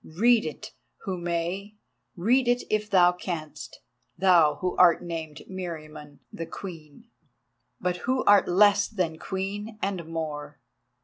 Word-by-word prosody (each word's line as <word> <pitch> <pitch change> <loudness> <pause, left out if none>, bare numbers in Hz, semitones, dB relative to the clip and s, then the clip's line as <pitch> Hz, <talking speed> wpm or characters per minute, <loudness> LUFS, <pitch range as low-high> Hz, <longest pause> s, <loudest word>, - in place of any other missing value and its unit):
Read 235 +2 +5
it 155 - -8 0.3
who 190 - -3
may—read 175 - -2
it 245 0 +2
if 210 0 0
thou 180 -3 +5
canst, 170 -4 -7 0.4
thou 170 -5 +5
who 180 +4 -3
art 180 -1 +5
named 160 -3 -6
Meriamun 155 -5 -8 0.2
the 165 - -6
Queen, 160 -6 -10 0.7
but 180 0 -1
who 255 +6 -1
art 205 -1 +5
less 205 +2 +4
than 175 -7 -3
Queen 205 +3 -5
and 195 -4 -2
more. 150 -3 -5
180 Hz, 125 wpm, -26 LUFS, 160-205 Hz, 0.7 s, Read